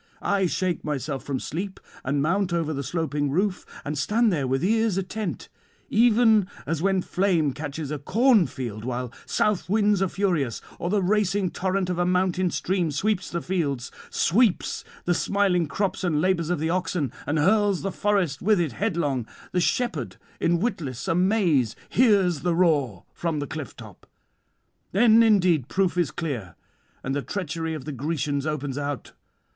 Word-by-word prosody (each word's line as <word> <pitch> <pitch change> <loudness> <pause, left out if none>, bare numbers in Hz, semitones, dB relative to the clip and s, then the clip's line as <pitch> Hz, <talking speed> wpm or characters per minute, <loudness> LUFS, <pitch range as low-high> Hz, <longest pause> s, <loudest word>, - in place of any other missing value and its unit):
I 195 -2 +2
shake 180 0 -1
myself 145 -2 -3
from 135 -2 -2
sleep 190 +5 -5 0.2
and 140 +2 0
mount 190 +3 +1
over 165 -2 0
the 140 - -3
sloping 150 -1 -1
roof, 185 +5 -1 0.2
and 145 - -2
stand 210 +9 +2
there 140 -5 0
with 135 +4 0
ears 220 0 +2
attent: 195 +1 -4 0.4
even 220 -3 +5 0.2
as 160 +2 -2
when 190 -1 +2
flame 175 -7 +1
catches 145 0 -5
a 150 - -3
corn 225 - +4
field 115 -4 -6
while 125 0 -4
south 210 -4 0
winds 205 -1 +3
are 195 - +3
furious, 175 - 0 0.2
or 175 - -2
the 200 0 +1
racing 200 -1 +1
torrent 190 0 -1
of 180 -1 -2
a 175 - +2
mountain 185 0 +1
stream 180 -1 0
sweeps 190 +6 -1
the 170 -1 -3
fields, 145 -9 -2 0.2
sweeps 210 +1 +2 0.2
the 175 - +2
smiling 185 -3 +1
crops 195 +4 -2
and 165 -5 +1
labours 170 -1 +1
of 180 - +1
the 160 +2 0
oxen, 175 -7 -1 0.2
and 145 +2 0
hurls 200 +3 +3
the 195 - -1
forest 195 -10 0
with 210 0 +3
it 165 -5 0
headlong; 145 - -1 0.2
the 180 - +1
shepherd 245 +7 -1 0.2
in 170 0 +2
witless 155 - -3
amaze 175 - +2
hears 200 - +3
the 175 +1 0
roar 145 - +1
from 165 -3 -2
the 145 - -2
cliff 150 0 -7
top. 110 -6 -13 0.9
Then 225 +3 +6
indeed 185 - +4
proof 190 +1 +1
is 175 -3 +1
clear, 125 - -5 0.5
and 135 - -2
the 145 - 0
treachery 165 -2 -3
of 150 - -7
the 150 - -4
Grecians 145 +1 -2
opens 145 -2 -3
out. 145 -1 -4
175 Hz, 165 wpm, -25 LUFS, 145-195 Hz, 0.9 s, Then